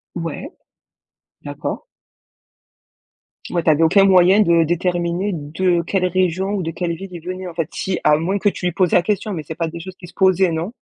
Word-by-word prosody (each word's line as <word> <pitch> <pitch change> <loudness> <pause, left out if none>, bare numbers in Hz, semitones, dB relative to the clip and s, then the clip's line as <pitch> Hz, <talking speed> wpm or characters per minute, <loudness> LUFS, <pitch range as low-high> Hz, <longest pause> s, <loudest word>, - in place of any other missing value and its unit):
Ouais. 170 - -5 0.9
D'accord. - - -5 1.7
Ouais, 170 -2 -1
tu - - +2
avais 155 +1 +4
aucun 195 +5 +5
moyen 190 +1 +5
de 170 -4 +4
déterminer 175 +3 -1
de 170 +3 0
quelle 185 +2 -1
région 185 +1 0
ou 190 - -2
de 165 - -3
quelle 175 -1 -3
ville 195 +4 -8
il 170 - -8
venait, 185 +1 -5
en 175 - -8
fait, 165 -2 -3
si 190 -1 -2
à 150 - +4
moins 185 +6 -1
que 205 - +2
tu 185 - -6
lui 180 - 0
posais 180 0 +3
la - - +3
question. 210 0 -2
Mais 160 -4 -5
c'est 160 +2 -7
pas 165 -1 -2
des 170 +1 -8
choses 185 +2 -9
qui 175 - -12
se 170 - -16
posaient, 190 -1 +3
non? 165 +7 -3
175 Hz, 210 wpm, -19 LUFS, 165-190 Hz, 1.7 s, aucun